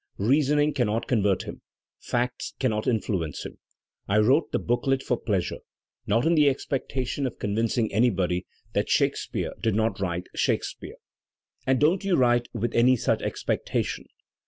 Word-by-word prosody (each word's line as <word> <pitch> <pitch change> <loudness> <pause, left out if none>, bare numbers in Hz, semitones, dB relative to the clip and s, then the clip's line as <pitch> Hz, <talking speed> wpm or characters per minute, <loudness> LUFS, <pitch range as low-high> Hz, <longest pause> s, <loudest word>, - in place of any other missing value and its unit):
Reasoning 145 +6 +2
cannot 115 -4 0
convert 100 -6 +1
him, - - -8 0.4
facts 125 +1 -2
cannot 110 -5 0
influence 95 - -1
him. - - -9 0.5
I 100 - +2
wrote 130 +9 +3
the - - +1
booklet 130 +3 0
for 125 - +1
pleasure 100 -6 -2 0.3
— - - -20
no^ 115 +6 +2
in 165 - +4
the 150 -3 +5
expectation 130 0 -2
of 120 - -7
con 100 - -2
vincing 115 0 0
anybody 95 -6 +1 0.3
that - - 0
Shakespeare - - 0
did 110 -3 +1
not 110 0 0
write 90 -2 -2
Shake - - +1
speare. - - -8 0.7
And 130 -1 +3
don't 165 +6 +3
you 195 -2 +2
write 120 -3 +3
with 115 0 -2
any 125 +2 +5
such 115 - 0
expectation. - - -2
120 Hz, 155 wpm, -26 LUFS, 105-135 Hz, 0.7 s, the